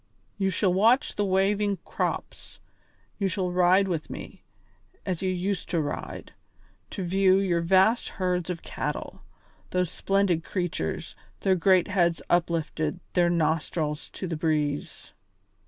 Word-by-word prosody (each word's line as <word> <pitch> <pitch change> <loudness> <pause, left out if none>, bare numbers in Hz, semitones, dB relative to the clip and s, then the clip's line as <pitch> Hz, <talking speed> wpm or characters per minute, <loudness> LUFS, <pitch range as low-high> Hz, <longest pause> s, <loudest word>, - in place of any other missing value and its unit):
You 195 -1 +2
shall 185 0 +1
watch 230 +9 +3
the 205 - -1
waving 200 +1 +1
crops; - - -4 0.6
you 200 - +1
shall 180 0 -1
ride 180 +2 +4
with 165 -4 -3
me, - - -8 0.6
as 185 -4 -2
you 190 - 0
used 185 +1 -2
to 170 - +1
ride, 150 - -5 0.6
to 195 - -5
view 190 +1 +4
your 180 -4 +1
vast 190 +7 +3
herds 180 -2 -1
of 175 -2 -4
cattle - - -4 0.5
those 180 -2 0
splendid 195 -4 +1
creatures, 175 - -3 0.3
their 190 - +3
great 185 0 +4
heads 175 -3 +2
uplifted, 165 -2 0
their 175 -1 +3
nostrils 160 -2 -1
to - - -6
the 165 - -3
breeze." 150 -2 -2
180 Hz, 135 wpm, -27 LUFS, 165-195 Hz, 0.6 s, ride